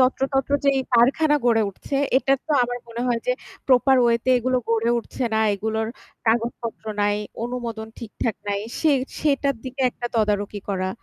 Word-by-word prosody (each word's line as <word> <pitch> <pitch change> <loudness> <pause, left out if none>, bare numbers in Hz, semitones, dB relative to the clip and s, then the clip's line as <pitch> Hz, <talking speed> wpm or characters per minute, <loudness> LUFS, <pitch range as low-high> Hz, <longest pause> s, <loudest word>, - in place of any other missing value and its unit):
যত্রতত্র 270 +1 +1
যেই 275 -1 +3
কারখানা 280 +6 +4
গড়ে 230 -2 +4
উঠছে 275 +8 -5 0.2
এটা 270 - +1
তো - - -7
আমার 245 0 -2
মনে 230 +1 -6
হয় 235 -2 +1
যে 250 - +3 0.3
প্রপার 265 +1 +5
ওয়েতে 235 +1 +1
এগুলো 255 +2 0
গড়ে 230 0 +2
উঠছে 245 +2 -4
না, 220 - +3 0.2
এগুলোর 220 +2 -2 0.4
কাগজপত্র 230 0 -1 0.2
নাই, 205 0 +2 0.3
অনুমোদন 235 -2 -4
ঠিকঠাক 230 0 -3
নাই, 200 0 0 0.2
সে 315 - +4 0.3
সেটার 280 -2 +1
দিকে 260 +1 -4
একটা 240 - -5
তদারকি 210 -2 0
করা। 185 -2 -1
235 Hz, 160 wpm, -23 LUFS, 220-265 Hz, 0.4 s, প্রপার